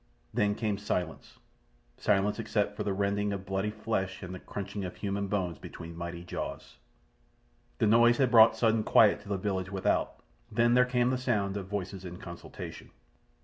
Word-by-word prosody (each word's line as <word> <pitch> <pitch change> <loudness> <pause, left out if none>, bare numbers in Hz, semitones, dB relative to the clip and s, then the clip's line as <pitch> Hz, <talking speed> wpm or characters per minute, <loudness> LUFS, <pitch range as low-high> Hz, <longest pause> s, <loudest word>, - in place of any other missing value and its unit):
Then 105 0 +2
came 105 -3 -1
silence—silence 90 - -3
except 105 -1 0
for - - -4
the 100 - -1
rending 100 +1 0
of 95 -1 -4
bloody 95 +2 -1
flesh 105 -3 -3
and 90 0 -6
the 95 - -7
crunching 100 0 -5
of 90 - -5
human 100 0 -2
bones 90 -6 -2
between 85 0 -9
mighty 85 0 -6
jaws. 90 - -6 1.0
The - - +2
noise 120 +2 +5
had 130 -3 +2
brought 115 -2 +7
sudden 115 -1 +3
quiet 105 -1 +5
to - - -13
the 100 - 0
village 95 -1 -2
without. 95 -1 0 0.4
Then 120 +2 +3
there 125 0 +6
came 125 0 +1
the 130 - 0
sound 105 -6 0
of 100 -2 -4
voices 95 -1 -4
in 90 -1 -7
consultation. 85 -1 -9
100 Hz, 170 wpm, -30 LUFS, 95-110 Hz, 1.0 s, brought